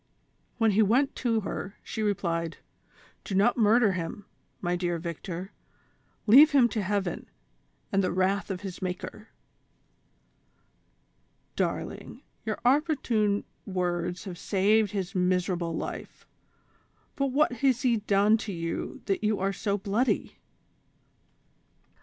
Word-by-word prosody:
When 225 -2 +3
he 210 +2 +3
went 245 +7 +3
to 230 -3 +1
her, 195 0 -5
she 220 - -5
replied: 170 -5 -1 0.7
"Do 195 - -4
not 205 +5 +4
murder 225 -1 +4
him, 185 +2 -5 0.3
my 175 -1 -1
dear 175 -1 -1
Victor, 170 +3 -6 0.7
leave 285 +8 +8
him 260 -4 +6
to 220 - -2
heaven, 195 -2 -2 0.6
and 195 0 +2
the 185 - 0
wrath 190 +3 0
of 185 -2 -4
his 190 -3 -7
Maker." 190 +4 -5 2.3
"Darling, - - -3 0.2
your - - -2
opportune 245 -7 +2 0.2
words 180 -2 -2
have 180 -3 -7
saved 205 +2 +2
his 195 -2 -3
miser 180 0 +1
able 170 -2 -3
life; - - -6 0.9
but 275 -1 0
what 280 +3 +2
has 250 +1 +1
he 240 -3 +3
done 210 +1 +3
t9 200 -5 -5
you 165 0 -4
that 195 +1 -1
you 210 -1 +2
are 195 +1 0
so 200 0 -1
bloody?" 210 +6 -1
200 Hz, 125 wpm, -28 LUFS, 180-225 Hz, 2.3 s, leave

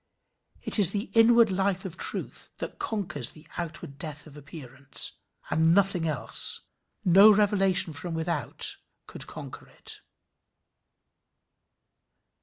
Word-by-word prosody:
It - - 0
is 195 -5 +7
the 205 +4 -4
inward 230 -1 +5
life 190 0 -1
of 185 -3 -6
truth - - -4
that - - -7
conquers 170 - -2
the 155 0 -15
outward 160 -4 -7
death 150 -1 -6
of 150 -2 -14
appearance; 140 -2 -2 0.3
and 160 +1 +3
nothing 195 -4 +1
else, 150 -4 +3 0.4
no 195 +4 +7
revelation 195 -5 +2
from 165 +3 -5
without, 160 -2 -1 0.3
could - - -8
conquer - - -10
it. - - -6
175 Hz, 115 wpm, -26 LUFS, 155-200 Hz, 0.4 s, is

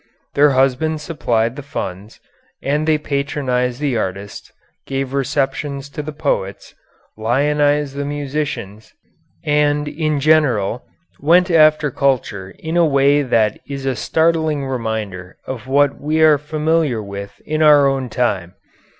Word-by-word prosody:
Their 145 +1 +5
husbands 150 +4 +1
supplied 120 -8 -1
the 145 - -6
funds, 100 -6 -6 0.4
and 150 +3 0
they 155 -1 +4
patronized 140 -4 -2
the 140 -5 0
artists, 100 0 -5 0.4
gave 135 -1 -3
receptions 140 0 -2
to 150 +2 -5
the 150 +1 -6
poets, 140 -10 -3 0.4
lionized 145 +5 +1
the 145 - -2
musicians, 145 -7 -4 0.5
and, 150 0 +2
in 155 -1 -1
general, 130 -8 +2 0.4
"went 175 +5 +4
after 155 -2 +4
culture" 120 -9 -1
in 160 +2 -3
a 170 - +5
way 140 -1 +3
that 115 -6 +1
is 140 -1 -5
a 135 -1 0
startling 160 -1 +1
reminder 110 -8 -4
of 130 -1 -6
what 140 +1 +2
we 155 +2 0
are 155 -2 +6
familiar 150 -5 0
with 100 0 -8
in 155 +1 -1
our 150 -2 +6
own 135 -2 0
time. 100 -7 -1
140 Hz, 135 wpm, -18 LUFS, 120-150 Hz, 0.5 s, are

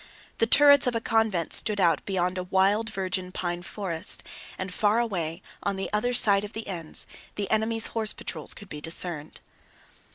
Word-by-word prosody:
The 225 - +3
turrets 285 +1 +6
of 245 - 0
a - - +1
convent 220 -7 0
stood 210 -2 +2
out 170 -5 +2
beyond 185 -1 -1
a - - -3
wild 195 +4 +1
virgin 185 -2 -3
pine 175 -1 -4
forest, 180 -3 0 0.3
and 185 -1 -5
far 210 +2 +1
away 185 -7 -3 0.2
on 200 -1 -2
the 195 - -4
other 215 +4 0
side 200 -5 +4
of 210 - -8
the 220 - -6
Enns 170 -5 +2 0.3
the 205 -1 -3
enemy's 220 +1 +1
horse 220 -2 0
patrols - - -4
could 205 - -12
be 150 -4 -9
discerned. 165 -1 -1
195 Hz, 175 wpm, -26 LUFS, 180-220 Hz, 0.3 s, turrets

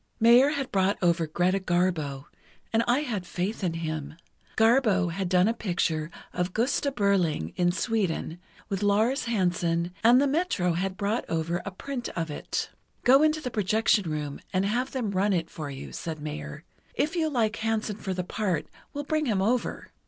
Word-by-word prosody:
Mayer 240 +4 +7
had 280 -3 -3
brought 195 +1 +2
over 170 -2 +2
Greta 180 +5 +1
Garbo, 175 -7 0 0.5
and 225 +1 +3
I 245 +4 +3
had 230 -10 -3
faith 185 +4 -3
in 175 -3 0
him. 155 -2 -4 0.4
Garbo 220 -6 +4
had 185 +1 -2
done 180 +1 +4
a 225 - +2
picture 170 -7 -1 0.2
of 180 +1 -2
'Gosta 265 +4 +1
Berling' 180 - +1
in 175 0 +2
Sweden, 185 -5 -1 0.3
with 195 -1 -3
Lars 220 +7 +2
Hansen, 175 -5 0
and 240 +3 +7
the 280 - +3
Metro 275 - +1
had 190 +2 -2
brought 210 +3 0
over 165 +2 -1
a - - -3
print 245 +6 -5
of 165 -2 -2
it. - - -3 0.3
'Go 265 +3 +6
into 310 0 +3
the 250 -4 -4
projection 210 -2 +2
room 150 -2 -4
and 190 0 +1
have 245 +6 0
them 240 -6 -2
run 200 +1 +2
it 165 -2 -1
for 150 -3 -6
you,' 135 -1 -8
said 160 -2 -5
Mayer. 75 - -6 0.3
'If 310 +4 0
you 320 -2 +1
like 230 -5 0
Hansen 220 -2 -1
for 190 -3 -4
the 180 - -2
part, 180 -5 -1 0.3
we'll 290 - -2
bring 310 0 0
him 210 -5 +1
over. 230 +5 -1
195 Hz, 180 wpm, -27 LUFS, 170-230 Hz, 0.5 s, Mayer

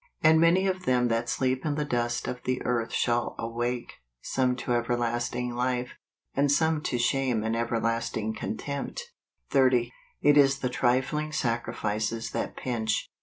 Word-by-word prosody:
" - - -49
And 160 0 +6
many 175 +3 +4
of 185 -1 -1
them 125 -3 +2
that 115 +1 0
sleep 130 0 0
in 150 -2 -1
the 150 0 -1
dust 120 -3 -1
of 125 - -4
the 130 0 -1
earth 120 -2 -1
shall 120 -1 0
aicake, 120 +1 -3 0.3
some 130 -1 +1
to 125 0 -2
everlasting 120 +1 -1
life, 125 0 -1 0.4
and 140 +1 +2
some 160 +1 +2
to 125 - 0
shame 120 -2 +1
and 110 +1 0
everlasting 115 -1 -1
contempt 140 - -5 0.4
30. 125 -3 +3 0.3
It 145 0 +6
is 135 -1 +5
the 125 - -2
trifling 130 +5 0
sacrifices 115 -4 -2
that - - -3
pinch. 110 -4 -2
125 Hz, 155 wpm, -27 LUFS, 120-135 Hz, 0.4 s, And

